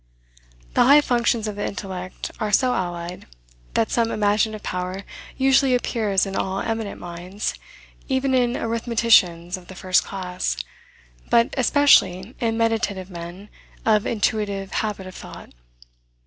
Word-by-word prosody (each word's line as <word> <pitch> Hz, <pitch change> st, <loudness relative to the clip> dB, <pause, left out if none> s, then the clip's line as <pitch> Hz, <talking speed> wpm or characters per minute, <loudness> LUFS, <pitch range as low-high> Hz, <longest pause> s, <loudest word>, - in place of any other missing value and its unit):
The -, -, +4 dB
high 285 Hz, +3 st, +8 dB
functions 235 Hz, -4 st, +1 dB
of 210 Hz, -, -4 dB
the 205 Hz, -, -2 dB
intellect 185 Hz, -2 st, -6 dB
are 215 Hz, -1 st, -1 dB
so 250 Hz, +3 st, +3 dB
allied, 175 Hz, -1 st, -4 dB, 0.5 s
that 225 Hz, -, +1 dB
some 230 Hz, -1 st, +2 dB
imaginative 215 Hz, 0 st, +1 dB
power 185 Hz, +2 st, -4 dB, 0.3 s
usually 265 Hz, -1 st, +4 dB
appears 215 Hz, -5 st, +1 dB
in 195 Hz, 0 st, -5 dB
all 190 Hz, 0 st, -1 dB
eminent 225 Hz, -2 st, -3 dB
minds, 175 Hz, +4 st, -5 dB, 0.6 s
even 265 Hz, 0 st, +1 dB
in 245 Hz, -2 st, +3 dB
arithmeticians 220 Hz, -7 st, +2 dB
of 180 Hz, -1 st, -14 dB
the 190 Hz, -, -10 dB
first 185 Hz, 0 st, +2 dB
class, 180 Hz, -, -3 dB, 0.7 s
but 235 Hz, 0 st, +3 dB
especially 245 Hz, -7 st, +4 dB
in 225 Hz, -2 st, 0 dB
meditative 220 Hz, -5 st, -1 dB
men 175 Hz, +4 st, -8 dB, 0.4 s
of 215 Hz, -2 st, +3 dB
an -, -, 0 dB
intuitive 200 Hz, -2 st, -1 dB
habit 210 Hz, -3 st, -2 dB
of 185 Hz, -, -9 dB
thought. -, -, -11 dB
205 Hz, 135 wpm, -23 LUFS, 185-230 Hz, 0.7 s, high